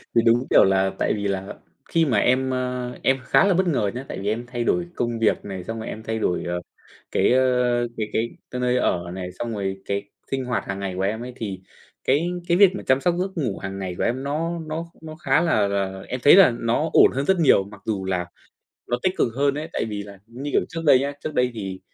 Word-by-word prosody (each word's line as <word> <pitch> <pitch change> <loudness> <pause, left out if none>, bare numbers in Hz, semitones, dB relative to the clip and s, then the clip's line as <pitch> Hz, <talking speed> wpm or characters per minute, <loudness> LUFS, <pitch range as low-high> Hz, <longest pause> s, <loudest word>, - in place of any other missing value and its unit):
thì 115 - +6
đúng, 120 +3 +3
kiểu, - - +7
là 95 0 +2
tại - - +1
vì 100 -1 -2
là 95 0 -3 0.3
khi 165 -1 +3
mà 125 -8 +1
em, 130 +4 +2
ơ, 125 -1 -2
em 135 0 +3
khá - - +4
là 200 - +4
bất 185 +1 +2
ngờ 115 - +1
nhé, 130 +2 -5
tại - - -6
vì 100 - -4
em 115 +3 -2
thay 120 -1 -3
đổi 175 +8 +1
công 120 -1 -2
việc 115 - +1
này, 95 -3 -6
xong 115 +4 -5
rồi 110 - -6
em 110 - -6
thay 110 0 -3
đổi, 90 -5 0
ờ, 90 0 -3 0.5
cái, - - +3
ơ, 125 -2 +2
cái 110 -2 -2
cái 115 +1 0 0.2
cái 125 - -3
nơi 125 0 +2
ở 85 -7 0
này, 90 -1 -5
xong 120 -1 -3
rồi 95 -2 -3
cái 100 0 -3 0.2
sinh 135 -1 -1
hoạt 125 -1 -2
hàng 100 0 -4
ngày 100 -1 -3
của 95 - -3
em 105 +4 -1
ấy 125 0 -7
thì 100 -6 -5 0.4
cái 140 +3 +3 0.3
cái 175 0 +3
việc 200 0 +8
mà - - -6
chăm 130 +1 +2
sóc 175 +2 +2
giấc 190 +1 -1
ngủ 125 -11 -1
hàng 95 0 -5
ngày 90 -2 -4
của - - -1
em 130 +3 -1
nó 165 +4 -2
nó 160 +1 -4 0.2
nó 155 -1 -8
khá 150 0 +2
là 135 -12 +2
là 95 -1 -2
em 125 - -3
thấy 145 - +9
là 195 -9 +8
nó 115 +8 0
ổn - - +7
hơn 135 +2 -1
rất 190 +1 +2
nhiều, 145 -11 +5
mặc 100 0 -13
dù 100 -4 -2
là 90 -2 -1 0.6
nó 120 - 0
tích 185 - +1
cực - - +2
hơn 140 0 +2
ấy. 150 +2 -4
Tại - - -1
vì 105 -2 -4
là, 100 -1 -12
như 130 +5 -6
kiểu, - - +4
trước 165 -1 -5
đây 135 -3 +7
nhá, 140 +2 -2
trước 155 - -4
đây 125 0 +2
thì 95 -4 -5
120 Hz, 260 wpm, -23 LUFS, 100-140 Hz, 0.6 s, thấy